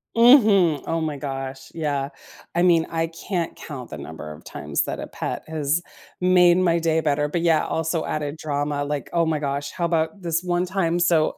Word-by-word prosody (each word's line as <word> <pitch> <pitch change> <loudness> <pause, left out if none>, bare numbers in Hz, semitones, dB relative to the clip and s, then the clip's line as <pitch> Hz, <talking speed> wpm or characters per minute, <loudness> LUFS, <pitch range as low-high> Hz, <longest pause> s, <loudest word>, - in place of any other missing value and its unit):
Mhm. 210 - +6
Oh 165 0 0
my 155 -2 -2
gosh. 135 -1 -6
Yeah. 145 -4 -2 0.4
I 175 - +2
mean, 170 -2 +4
I 165 0 -1
can't 170 +1 -4
count 130 -6 -8
the 75 - -6
number 75 +2 -8
of - - -14
times - - -2
that - - -4
a - - -5
pet - - -5
has 155 +1 0 0.4
made 180 -1 +5
my 170 -2 +3
day 160 -1 +1
better, 150 -1 +1
but, 170 - -1
yeah, 165 -2 +3
also 160 0 -1
added 150 0 -3
drama, 145 -1 -2
like, 145 0 -3
oh 170 -1 +3
my 160 -2 0
gosh. 140 0 -3
How 170 -2 -1
'bout 165 +4 -1
this 170 0 -1
one 175 0 0
time, 175 -2 0
so, 165 -3 +2
160 Hz, 195 wpm, -23 LUFS, 145-175 Hz, 0.4 s, Mhm